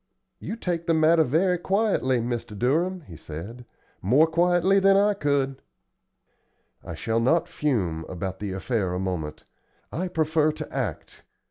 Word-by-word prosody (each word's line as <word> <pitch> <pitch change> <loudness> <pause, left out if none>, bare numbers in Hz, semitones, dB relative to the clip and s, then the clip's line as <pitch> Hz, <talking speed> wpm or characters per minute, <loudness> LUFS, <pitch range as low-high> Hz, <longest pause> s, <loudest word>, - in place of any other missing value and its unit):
"You - - -5
take 175 -6 -3
the 165 - +3
matter 160 +1 +5
very 175 +6 +1
quietly, 190 - +1
Mr. 115 -3 -4
Durham;" 170 - 0
he 90 - -12
said; 95 +12 -9 0.4
"more 130 - +4
quietly 175 +3 +3
than 195 0 +5
I 205 +1 +4
could." 140 -6 -1 1.2
"I - - -7
shall 115 0 -1
not 145 +9 +2
fume 95 - -1
about 95 +1 -5
the 105 -2 -4
affair 95 -1 -2
a - - -2
moment. 90 -5 -4 0.5
I 185 +3 -2
prefer 155 -2 +1
to 155 -1 -8
act. 115 - -4
145 Hz, 145 wpm, -25 LUFS, 105-175 Hz, 1.2 s, matter